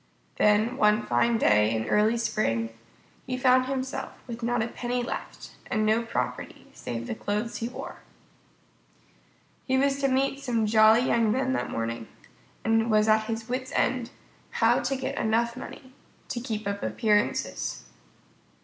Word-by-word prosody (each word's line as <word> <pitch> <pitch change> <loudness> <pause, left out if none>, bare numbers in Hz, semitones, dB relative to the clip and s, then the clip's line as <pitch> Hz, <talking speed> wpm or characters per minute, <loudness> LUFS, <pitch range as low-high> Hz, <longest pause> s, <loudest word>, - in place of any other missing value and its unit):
Then 215 +4 +3
one 210 -3 +3
fine 225 - +2
day 105 - +3
in 110 0 -2
early 215 - +2
spring 115 - -1 0.5
he 255 -1 -2
found 255 0 +4
himself 265 -1 -3
with 235 -1 -7
not 240 0 0
a - - -2
penny 245 +1 -3
left, - - -6 0.2
and 215 0 0
no 220 +2 +3
property 230 - -4
save 115 -1 -5
the - - -3
clothes 210 - -3
he 230 - -3
wore. - - -8 1.7
He 260 0 +2
was 275 +1 +2
to 275 - +2
meet 270 +1 +1
some 240 -5 0
jolly 220 +1 +6
young 230 -3 +2
men 260 +2 0
that - - -2
morning, 115 0 -3 0.6
and 225 0 +3
he 225 - -2
was 215 -1 +3
at 215 0 +4
his 225 +1 -4
wits' 255 +1 -3
end 250 -2 +1 0.4
how - - +3
to 275 - -1
get 260 - -3
enough 235 +1 +1
money 255 +1 -10 0.4
to 240 - -3
keep 220 -3 -4
up 200 0 -3
appearances. 210 -3 0
230 Hz, 160 wpm, -27 LUFS, 210-255 Hz, 1.7 s, jolly